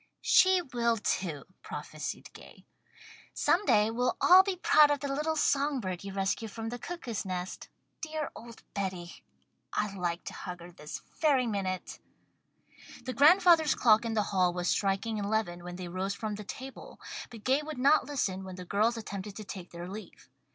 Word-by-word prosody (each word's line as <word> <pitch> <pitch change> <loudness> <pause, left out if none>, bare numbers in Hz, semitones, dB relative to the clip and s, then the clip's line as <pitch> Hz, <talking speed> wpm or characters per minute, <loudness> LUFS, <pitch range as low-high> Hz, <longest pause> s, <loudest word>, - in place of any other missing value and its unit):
"She 375 -1 +5
will, 235 -5 0
too," 170 -8 -2 0.2
prophesied - - -6
Gay. - - -15 0.7
"Some 355 +4 +2
day 210 +1 +4
we'll 245 +2 0
all 365 +1 +8
be 390 -1 -2
proud 305 -4 +5
of 290 -1 +1
the 280 0 -3
little 305 +3 -1
song 285 -2 +2
bird 185 -5 -4
you 195 - -6
rescued 195 +3 -1
from 225 +1 -5
the 245 +1 -6
Cuckoo's 245 -9 -5
Nest. 185 -1 -5 0.3
Dear 310 -1 -4
old 235 0 -11
Betty! 185 -3 -4 0.5
I'd 210 -2 -1
like 175 -2 -2
to - - -7
hug 180 -2 -7
her 175 +1 -11
this 150 -3 -8 0.2
very 280 -5 +3
minute." 195 -4 -3 1.0
The 255 - -4
grandfather's 325 +1 +6
clock 220 -1 +5
in 230 -1 -2
the 210 - +2
hall 185 -2 +3
was 180 0 -1
striking 205 +2 0
eleven 200 -4 -1
when 175 0 -7
they 180 -1 -6
rose 190 +3 -3
from 215 0 -4
the 210 +1 -6
table, 265 +6 -9 0.3
but 225 -3 -11
Gay 265 +5 +2
would 305 -2 -7
not 275 +2 +4
listen 195 -10 -2
when 185 -1 -8
the 180 0 -8
girls 215 +6 +1
attempted 205 -2 -6
to 215 - -7
take 185 -3 -8
their 170 +1 -8
leave. 210 +3 -10
215 Hz, 180 wpm, -30 LUFS, 185-275 Hz, 1.0 s, all